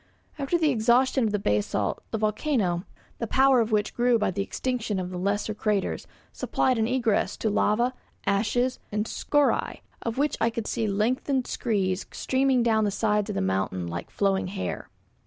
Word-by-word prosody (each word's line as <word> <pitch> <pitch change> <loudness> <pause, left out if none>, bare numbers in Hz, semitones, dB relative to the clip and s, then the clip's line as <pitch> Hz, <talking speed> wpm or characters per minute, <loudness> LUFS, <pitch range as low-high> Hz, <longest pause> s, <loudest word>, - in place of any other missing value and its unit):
After 280 +5 +1
the 315 -3 +2
exhaustion 245 +2 +3
of 215 - 0
the 210 - +1
basalt, 105 - 0
the 225 - -2
volcano, 210 - 0 0.3
the 230 - -2
power 265 +1 +4
of 225 0 -1
which 210 -1 +1
grew 240 0 +3
by 210 -3 0
the 195 - -2
extinction 230 0 -2
of 185 -1 -3
the 180 - -5
lesser 205 +3 -1
craters, 210 -2 -1 0.3
supplied 255 -3 0
an 220 - +2
egress 240 -4 +1
to 220 - 0
lava, 235 +5 +2 0.3
ashes, 235 +5 +1
and 210 +1 -1
scoriae, 290 +5 0 0.2
of 230 0 -3
which 290 +2 +1
I 230 - +4
could 230 -1 -4
see 225 -1 -1
lengthened 250 +6 0
screes 195 -5 -1
streaming 260 -1 +1
down 220 -2 +3
the 210 - +2
sides 210 0 0
of - - -3
the 95 - 0
mountain 95 -1 -1
like 85 0 -5
flowing 195 -2 0
hair. 195 +1 -4
220 Hz, 175 wpm, -26 LUFS, 200-250 Hz, 0.3 s, power